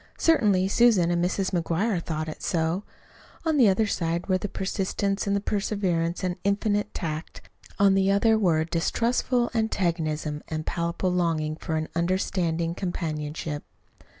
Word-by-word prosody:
Certainly 205 Hz, -, +3 dB
Susan 205 Hz, -7 st, +4 dB
and 175 Hz, 0 st, +1 dB
Mrs. 185 Hz, +1 st, 0 dB
McGuire 175 Hz, +3 st, 0 dB
thought 155 Hz, -1 st, -3 dB
it 155 Hz, -, -7 dB
so. 165 Hz, +2 st, 0 dB, 0.6 s
On 320 Hz, -2 st, +2 dB
the 245 Hz, -5 st, +6 dB
one 200 Hz, +3 st, +3 dB
side 170 Hz, -4 st, -1 dB
were 185 Hz, -1 st, +1 dB
persistence 195 Hz, +1 st, -2 dB
and 200 Hz, 0 st, 0 dB
perseverance 185 Hz, -5 st, -1 dB
and 180 Hz, -1 st, -1 dB
infinite 205 Hz, +1 st, 0 dB
tact. 155 Hz, -1 st, -5 dB, 0.4 s
On 200 Hz, -1 st, +5 dB
the 195 Hz, 0 st, +3 dB
other 210 Hz, +3 st, +4 dB
were 180 Hz, -7 st, +3 dB
a -, -, -1 dB
distrustful 235 Hz, +8 st, 0 dB
antagonism 165 Hz, -9 st, -1 dB
and 155 Hz, -1 st, -3 dB
a -, -, -8 dB
palpable 170 Hz, +3 st, -1 dB
longing 160 Hz, -3 st, 0 dB
for 160 Hz, 0 st, -4 dB
an 155 Hz, 0 st, -1 dB
understanding 170 Hz, -1 st, 0 dB
companionship. 155 Hz, -4 st, -4 dB
180 Hz, 145 wpm, -26 LUFS, 165-200 Hz, 0.6 s, the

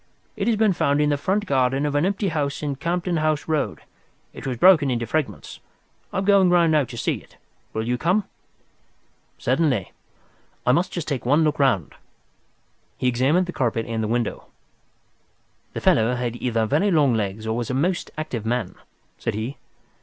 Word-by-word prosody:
It 210 Hz, -1 st, -2 dB
has 230 Hz, -, +3 dB
been 215 Hz, -2 st, +3 dB
found 145 Hz, -4 st, +1 dB
in 150 Hz, 0 st, +2 dB
the -, -, +3 dB
front 190 Hz, +8 st, 0 dB
garden 135 Hz, -2 st, +1 dB
of 145 Hz, -, -1 dB
an 145 Hz, +5 st, +2 dB
empty 200 Hz, 0 st, -1 dB
house 150 Hz, -2 st, -2 dB
in 145 Hz, -2 st, -2 dB
Campden 170 Hz, +2 st, -1 dB
House 155 Hz, -1 st, 0 dB
Road. 155 Hz, -2 st, -1 dB, 0.5 s
It -, -, -8 dB
was 125 Hz, -2 st, -2 dB
broken 160 Hz, -2 st, +6 dB
into 120 Hz, -2 st, -1 dB
fragments. 155 Hz, +5 st, -3 dB, 0.5 s
I -, -, -4 dB
am 190 Hz, -, 0 dB
going 200 Hz, -2 st, +5 dB
round 170 Hz, -2 st, +4 dB
now 150 Hz, -3 st, +3 dB
to -, -, -9 dB
see -, -, -1 dB
it. -, -, -18 dB, 0.3 s
Will 110 Hz, +1 st, -3 dB
you 125 Hz, 0 st, 0 dB
come?" 185 Hz, +8 st, +2 dB, 1.1 s
"Certainly. 130 Hz, -, 0 dB, 0.7 s
I 125 Hz, -, +4 dB
must 170 Hz, +8 st, +1 dB
just 170 Hz, -4 st, -4 dB
take 140 Hz, -5 st, -2 dB
one 145 Hz, +6 st, +3 dB
look 150 Hz, -1 st, 0 dB
round." 100 Hz, -, +2 dB, 1.0 s
He 125 Hz, -, 0 dB
examined 135 Hz, +9 st, +2 dB
the 180 Hz, -, -6 dB
carpet 115 Hz, -3 st, -1 dB
and 115 Hz, -1 st, -3 dB
the 110 Hz, -, -1 dB
window. 120 Hz, +1 st, -2 dB, 1.3 s
"The -, -, -4 dB
fellow 115 Hz, +3 st, +3 dB
had 120 Hz, -1 st, -3 dB
either 115 Hz, -3 st, 0 dB
very 150 Hz, -, +2 dB
long 150 Hz, -8 st, +3 dB
legs 110 Hz, 0 st, -2 dB
or 110 Hz, 0 st, -1 dB
was 120 Hz, -1 st, -3 dB
a 130 Hz, -, -1 dB
most 170 Hz, +6 st, 0 dB
active 145 Hz, -8 st, -4 dB
man," 110 Hz, -4 st, -2 dB, 0.5 s
said -, -, -2 dB
he. 115 Hz, +6 st, -4 dB
140 Hz, 185 wpm, -23 LUFS, 120-170 Hz, 1.3 s, broken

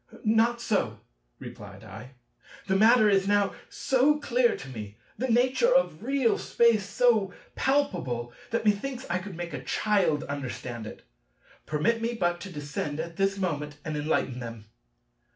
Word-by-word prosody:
"Not 225 Hz, +2 st, +3 dB
so," 215 Hz, -3 st, -1 dB, 0.4 s
replied 100 Hz, 0 st, -10 dB
I, 110 Hz, +5 st, -11 dB, 0.5 s
"the 190 Hz, -, +1 dB
matter 220 Hz, +2 st, +6 dB
is 195 Hz, -1 st, +3 dB
now 205 Hz, -1 st, +2 dB, 0.2 s
so 275 Hz, +3 st, +2 dB
clear 245 Hz, -4 st, +2 dB
to 135 Hz, -, -9 dB
me, 105 Hz, -5 st, -8 dB, 0.2 s
the 255 Hz, +4 st, -2 dB
nature 255 Hz, -, +3 dB
of -, -, +2 dB
real 265 Hz, -1 st, +1 dB
space 225 Hz, -4 st, +2 dB
so 215 Hz, -4 st, +2 dB, 0.2 s
palpable, 175 Hz, -, 0 dB, 0.2 s
that 230 Hz, -1 st, -1 dB
methinks 245 Hz, +5 st, 0 dB
I 180 Hz, -, +1 dB
could 185 Hz, -1 st, -8 dB
make 170 Hz, -1 st, -6 dB
a -, -, -5 dB
child 185 Hz, -8 st, +1 dB
understand 125 Hz, -5 st, -5 dB
it. -, -, -10 dB, 0.6 s
Permit 215 Hz, +10 st, +1 dB
me 235 Hz, +1 st, -1 dB
but 175 Hz, -4 st, 0 dB
to 195 Hz, -, -7 dB
descend 145 Hz, -1 st, -4 dB
at 170 Hz, +1 st, -5 dB
this 195 Hz, 0 st, +1 dB
moment 150 Hz, -6 st, -3 dB
and 155 Hz, -1 st, -3 dB
enlighten 145 Hz, -4 st, -1 dB
them." 115 Hz, -3 st, -8 dB
195 Hz, 150 wpm, -27 LUFS, 145-235 Hz, 0.6 s, matter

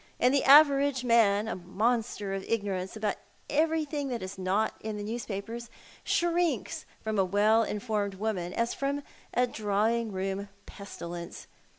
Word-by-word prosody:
And 250 Hz, +2 st, +4 dB
the 280 Hz, -, +3 dB
average 280 Hz, -2 st, +6 dB
man— 220 Hz, -3 st, +4 dB
a -, -, -2 dB
monster 205 Hz, +2 st, -1 dB
of 195 Hz, 0 st, -3 dB
ignorance 195 Hz, -4 st, -2 dB
about 210 Hz, -2 st, -1 dB, 0.3 s
everything 305 Hz, -1 st, +1 dB
that 240 Hz, -6 st, -3 dB
is 185 Hz, +1 st, -6 dB
not 190 Hz, +4 st, 0 dB
in 215 Hz, -1 st, -5 dB
the 205 Hz, -, -5 dB
newspapers 225 Hz, +1 st, -5 dB, 0.3 s
shrinks 345 Hz, -1 st, 0 dB, 0.2 s
from 220 Hz, -2 st, -1 dB
a -, -, +5 dB
well 205 Hz, +4 st, +3 dB
informed 210 Hz, -2 st, -2 dB
woman 190 Hz, -4 st, -2 dB
as 235 Hz, +4 st, -1 dB
from 280 Hz, +1 st, -2 dB, 0.3 s
a 250 Hz, -, +4 dB
drawing 220 Hz, 0 st, 0 dB
room 195 Hz, +1 st, -3 dB, 0.2 s
pestilence. 175 Hz, -4 st, -8 dB
220 Hz, 145 wpm, -29 LUFS, 200-250 Hz, 0.3 s, average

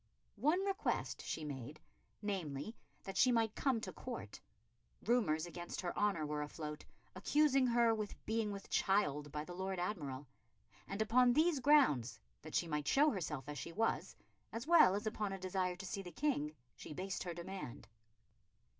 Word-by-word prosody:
One 310 Hz, +8 st, +3 dB
request 395 Hz, +1 st, -1 dB
she 160 Hz, -, -3 dB
made, 145 Hz, +1 st, -6 dB, 0.4 s
namely, 190 Hz, -1 st, -3 dB, 0.3 s
that 195 Hz, 0 st, -6 dB
she 255 Hz, -, +6 dB
might 225 Hz, -2 st, +2 dB
come 265 Hz, -5 st, +1 dB
to -, -, -5 dB
Court. 240 Hz, -, -7 dB, 0.6 s
Rumours 185 Hz, -9 st, +2 dB
against 175 Hz, 0 st, -6 dB
her 175 Hz, -2 st, -3 dB
honour 200 Hz, -7 st, +1 dB
were 150 Hz, 0 st, -2 dB
afloat, 150 Hz, 0 st, -5 dB, 0.3 s
accusing 280 Hz, -3 st, +3 dB
her 235 Hz, -1 st, +4 dB
with 215 Hz, -2 st, -5 dB
being 220 Hz, -1 st, 0 dB
with 200 Hz, -1 st, -7 dB
child 150 Hz, -7 st, +2 dB
by 150 Hz, +1 st, -3 dB
the 175 Hz, -, -8 dB
Lord 190 Hz, +1 st, -3 dB
Admiral; 150 Hz, -8 st, -3 dB, 0.6 s
and 200 Hz, +2 st, 0 dB
upon 245 Hz, +2 st, +5 dB
these 315 Hz, +1 st, +3 dB
grounds, 250 Hz, -, +4 dB, 0.2 s
that -, -, -8 dB
she 170 Hz, -, +2 dB
might 150 Hz, -2 st, -2 dB
show 295 Hz, +2 st, +5 dB
herself 150 Hz, -, -3 dB
as 145 Hz, -1 st, -5 dB
she 170 Hz, -, -6 dB
was, 225 Hz, +4 st, 0 dB, 0.4 s
as 230 Hz, +2 st, -4 dB
well 310 Hz, -, +7 dB
as 205 Hz, -, -3 dB
upon 210 Hz, -2 st, -2 dB
a -, -, -3 dB
desire 185 Hz, -1 st, -1 dB
to 190 Hz, +2 st, -8 dB
see 195 Hz, +1 st, -3 dB
the 180 Hz, -2 st, -8 dB
King, 210 Hz, -, 0 dB, 0.2 s
she -, -, -8 dB
based 190 Hz, +4 st, -3 dB
her 175 Hz, -2 st, -4 dB
demand. 175 Hz, -6 st, -7 dB
195 Hz, 170 wpm, -37 LUFS, 155-235 Hz, 0.6 s, well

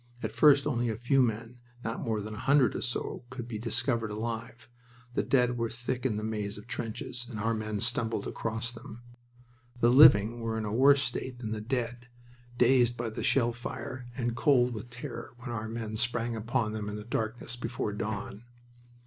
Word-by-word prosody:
At -, -, -1 dB
first 145 Hz, -2 st, +6 dB
only 120 Hz, -1 st, 0 dB
a 110 Hz, -, -1 dB
few 125 Hz, +4 st, +3 dB
men, 115 Hz, 0 st, -1 dB, 0.2 s
not 115 Hz, +1 st, -3 dB
more 110 Hz, -2 st, -1 dB
than 105 Hz, +1 st, -6 dB
a 105 Hz, -, -7 dB
hundred 140 Hz, 0 st, +4 dB
or -, -, -2 dB
so, 125 Hz, 0 st, -3 dB
could 125 Hz, -2 st, -6 dB
be 110 Hz, -3 st, -5 dB
discovered 115 Hz, 0 st, 0 dB
alive. 115 Hz, +2 st, -5 dB, 0.5 s
The -, -, +2 dB
dead 125 Hz, -2 st, +2 dB
were 115 Hz, -1 st, 0 dB
thick 125 Hz, +2 st, -2 dB
in 110 Hz, -4 st, -2 dB
the 105 Hz, -, -3 dB
maze 105 Hz, -2 st, -3 dB
of 105 Hz, -, -10 dB
trenches, 120 Hz, +2 st, -5 dB
and 110 Hz, -4 st, -6 dB
our 115 Hz, +2 st, +1 dB
men 110 Hz, -1 st, -3 dB
stumbled 115 Hz, -3 st, 0 dB
across 115 Hz, +1 st, -3 dB
them. 120 Hz, 0 st, -11 dB, 0.8 s
The 120 Hz, 0 st, +5 dB
living 120 Hz, -4 st, +7 dB
were 115 Hz, -1 st, -2 dB
in 110 Hz, -, -2 dB
a 105 Hz, -, -3 dB
worse 140 Hz, +3 st, +6 dB
state 125 Hz, +1 st, -3 dB
than 115 Hz, -3 st, -5 dB
the 110 Hz, -1 st, -3 dB
dead, 120 Hz, +1 st, -3 dB, 0.5 s
dazed 120 Hz, -1 st, +4 dB
by 115 Hz, -1 st, -3 dB
the -, -, -5 dB
shell 120 Hz, -3 st, +3 dB
fire, 125 Hz, +1 st, -6 dB
and 120 Hz, -2 st, -1 dB
cold 125 Hz, -2 st, +4 dB
with 110 Hz, +2 st, -7 dB
terror 120 Hz, -1 st, -7 dB
when 120 Hz, 0 st, -7 dB
our 110 Hz, -2 st, -3 dB
men 110 Hz, -1 st, -4 dB
sprang 120 Hz, 0 st, 0 dB
upon 110 Hz, 0 st, -1 dB
them 105 Hz, -1 st, -4 dB
in 105 Hz, -, -4 dB
the 105 Hz, -, -6 dB
darkness 115 Hz, +1 st, -3 dB
before 115 Hz, -3 st, -3 dB
dawn. 105 Hz, +1 st, -4 dB
115 Hz, 195 wpm, -30 LUFS, 110-125 Hz, 0.8 s, living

